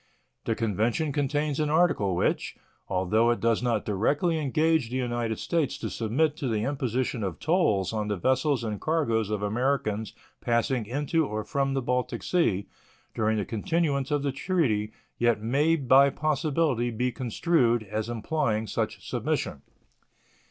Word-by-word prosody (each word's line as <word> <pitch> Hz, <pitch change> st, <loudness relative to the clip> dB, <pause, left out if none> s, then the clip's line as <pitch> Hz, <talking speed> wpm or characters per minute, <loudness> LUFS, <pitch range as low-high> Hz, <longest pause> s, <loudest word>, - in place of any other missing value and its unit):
The 115 Hz, -, 0 dB
convention 115 Hz, -, 0 dB
contains 145 Hz, +1 st, -1 dB
an 150 Hz, -1 st, +1 dB
article 150 Hz, -, +2 dB
which, -, -, 0 dB, 0.3 s
although 100 Hz, +5 st, +2 dB
it 120 Hz, -, +1 dB
does 115 Hz, -1 st, +1 dB
not 120 Hz, -4 st, 0 dB
directly 145 Hz, -, +1 dB
engage 155 Hz, -2 st, +1 dB
the 125 Hz, -, -5 dB
United 120 Hz, -3 st, -1 dB
States 165 Hz, -5 st, -1 dB
to -, -, -5 dB
submit 140 Hz, +7 st, 0 dB
to 145 Hz, -6 st, -3 dB
the 110 Hz, -3 st, 0 dB
imposition 130 Hz, -3 st, -1 dB
of 95 Hz, -4 st, -3 dB
tolls 115 Hz, -, +1 dB
on 105 Hz, -1 st, -2 dB
the 105 Hz, -, -1 dB
vessels 130 Hz, -, +1 dB
and 105 Hz, -2 st, -4 dB
cargoes 115 Hz, -10 st, 0 dB
of 105 Hz, -1 st, -2 dB
Americans 110 Hz, -1 st, -1 dB, 0.3 s
passing 120 Hz, -1 st, 0 dB
into 145 Hz, +5 st, 0 dB
or 110 Hz, 0 st, -3 dB
from 135 Hz, 0 st, -1 dB
the 135 Hz, -, -1 dB
Baltic 125 Hz, +1 st, -1 dB
Sea 110 Hz, -, +1 dB, 0.5 s
during 110 Hz, 0 st, +1 dB
the 105 Hz, -, -1 dB
continuance 140 Hz, +4 st, -1 dB
of 145 Hz, -1 st, 0 dB
the 140 Hz, -, 0 dB
treaty, 130 Hz, -, 0 dB, 0.3 s
yet 120 Hz, -2 st, +3 dB
may 140 Hz, +9 st, +2 dB
by 140 Hz, -1 st, +5 dB
possibility 150 Hz, -4 st, 0 dB
be 125 Hz, +2 st, -1 dB
construed 120 Hz, -1 st, +1 dB
as 110 Hz, +2 st, -4 dB
implying 115 Hz, -2 st, -1 dB
such -, -, -3 dB
submission. 70 Hz, -, -2 dB
125 Hz, 150 wpm, -27 LUFS, 110-145 Hz, 0.5 s, by